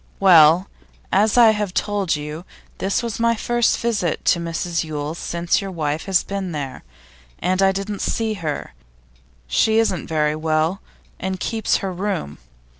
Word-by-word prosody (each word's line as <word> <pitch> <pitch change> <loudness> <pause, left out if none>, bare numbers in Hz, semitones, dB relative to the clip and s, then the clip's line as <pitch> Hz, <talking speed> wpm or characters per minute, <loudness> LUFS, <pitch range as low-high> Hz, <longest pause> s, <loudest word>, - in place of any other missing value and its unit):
'Well, 175 -1 +6 0.4
as 210 +4 +3
I 230 -2 +8
have 210 -3 -3
told 200 -5 0
you, 150 +3 -6 0.4
this 195 +5 0
was 230 -2 -4
my 230 0 +3
first 240 +1 +1
visit 210 -8 -1
to 170 - +3
Mrs 170 0 -2
Yule's 155 +1 -5
since 170 +3 0
your 195 - -5
wife 155 -3 -3
has 190 -2 +2
been 195 -3 -4
there, 140 -3 -5 0.5
and 185 +1 0
I 195 0 +5
didn't 195 +1 -4
see 225 -1 -1
her; 160 -7 -4 0.7
she 220 - +2
isn't 210 -6 +1
very 150 -1 +1
well, 160 +4 0 0.4
and 190 0 -3
keeps 225 +1 0
her 190 - -3
room. 185 - -3
185 Hz, 155 wpm, -21 LUFS, 160-205 Hz, 0.7 s, I